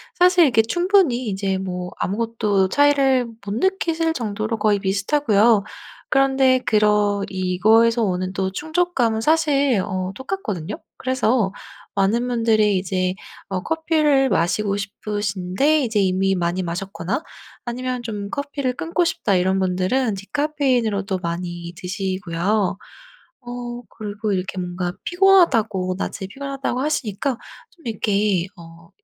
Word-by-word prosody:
사실 360 Hz, -1 st, +5 dB
이게 235 Hz, -4 st, +4 dB
충분히 325 Hz, -, +2 dB
이제 195 Hz, -1 st, -1 dB
뭐 180 Hz, -1 st, -4 dB
아무것도 210 Hz, -2 st, 0 dB
차이를 270 Hz, 0 st, +3 dB, 0.2 s
못 200 Hz, -, -3 dB
느끼실 330 Hz, -, 0 dB
정도로 220 Hz, -4 st, -3 dB
거의 210 Hz, -1 st, +2 dB
비슷하고요. 205 Hz, +1 st, +2 dB, 0.5 s
그런데 265 Hz, -1 st, +3 dB
그런 210 Hz, -1 st, +2 dB
이거에서 215 Hz, +6 st, +3 dB
오는 185 Hz, -2 st, -1 dB
또 190 Hz, -1 st, -1 dB
충족감은 315 Hz, -, 0 dB
사실 285 Hz, -6 st, +2 dB
어 185 Hz, -1 st, -3 dB
똑같거든요. 210 Hz, -, -4 dB, 0.2 s
그래서 245 Hz, -5 st, +1 dB, 0.4 s
많은 210 Hz, +5 st, +1 dB
분들이 220 Hz, -4 st, +2 dB
이제 185 Hz, 0 st, -1 dB, 0.3 s
어 190 Hz, -2 st, -2 dB
커피를 305 Hz, -, +2 dB
마시고 200 Hz, +3 st, +1 dB
싶으신데 205 Hz, +6 st, -1 dB
이제 225 Hz, -5 st, 0 dB
이미 190 Hz, 0 st, +2 dB
많이 175 Hz, +1 st, -1 dB
마셨거나 180 Hz, -, -3 dB, 0.4 s
아니면 250 Hz, +1 st, -3 dB
좀 205 Hz, -3 st, -5 dB
'커피를 280 Hz, -1 st, -3 dB
끊고 335 Hz, +6 st, -1 dB
싶다.' 200 Hz, -, 0 dB
이런 190 Hz, +1 st, +2 dB
분들은 190 Hz, +6 st, 0 dB
디카페인으로도 235 Hz, -4 st, 0 dB
많이 175 Hz, 0 st, -5 dB
드시고요. 190 Hz, +1 st, -1 dB, 0.6 s
어 245 Hz, 0 st, -6 dB
그리고 210 Hz, -1 st, -4 dB
이렇게 190 Hz, 0 st, -3 dB
뭔가 180 Hz, 0 st, -3 dB
피곤하다고 245 Hz, -, +3 dB
낮에 190 Hz, 0 st, -4 dB
피곤하다고 275 Hz, +2 st, -4 dB
하시니까 265 Hz, -4 st, -1 dB, 0.3 s
좀 335 Hz, -4 st, -24 dB
이렇게 205 Hz, -4 st, 0 dB
어 165 Hz, 0 st, -14 dB
215 Hz, 300 characters per minute, -21 LUFS, 190-265 Hz, 0.6 s, 사실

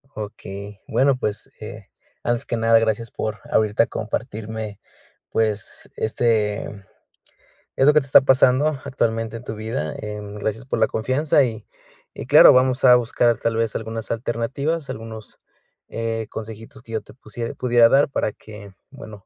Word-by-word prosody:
Okey. 100 Hz, -1 st, -8 dB
Bueno, 135 Hz, 0 st, +2 dB
pues, 105 Hz, -4 st, -3 dB
eh, -, -, -9 dB, 0.4 s
antes 120 Hz, 0 st, -1 dB
que 120 Hz, -, -2 dB
nada 115 Hz, 0 st, +4 dB
gracias 115 Hz, +1 st, -1 dB
por 110 Hz, 0 st, -4 dB
abrirte 110 Hz, +1 st, +3 dB
a -, -, -1 dB
compartirme, 110 Hz, -2 st, -5 dB, 0.5 s
pues, 110 Hz, -2 st, 0 dB
este 105 Hz, -3 st, -1 dB, 0.9 s
eso 145 Hz, +3 st, +5 dB
que 150 Hz, -, +6 dB
te 135 Hz, -, -9 dB
está 135 Hz, -, +7 dB
pasando 135 Hz, +2 st, +3 dB
actualmente 115 Hz, -4 st, -2 dB
en 115 Hz, -, -11 dB
tu 110 Hz, -, -6 dB
vida, 110 Hz, -8 st, -4 dB
en 105 Hz, -1 st, -7 dB
gracias 110 Hz, +3 st, -3 dB
por -, -, -2 dB
la -, -, +4 dB
confianza. 135 Hz, +5 st, +1 dB
Y 115 Hz, -3 st, -4 dB, 0.5 s
y -, -, -7 dB
claro, -, -, +8 dB
vamos 130 Hz, 0 st, +2 dB
a 125 Hz, -1 st, +9 dB
buscar 120 Hz, -1 st, +2 dB
tal 115 Hz, -1 st, -1 dB
vez 115 Hz, -1 st, -1 dB
algunas 115 Hz, 0 st, -5 dB
alternativas, 130 Hz, +7 st, -2 dB
algunos, 110 Hz, -1 st, -8 dB, 0.5 s
eh, 115 Hz, -1 st, -3 dB
consejitos 110 Hz, +3 st, -8 dB
que 115 Hz, -2 st, -12 dB
yo 110 Hz, -, -1 dB
te -, -, -16 dB
pusie 120 Hz, -2 st, -6 dB
pudiera 120 Hz, -2 st, +4 dB
dar 140 Hz, +3 st, +4 dB
para 110 Hz, -, -1 dB
que, 105 Hz, -2 st, -13 dB, 0.2 s
bueno, 110 Hz, -8 st, -12 dB
115 Hz, 155 wpm, -22 LUFS, 110-125 Hz, 0.9 s, a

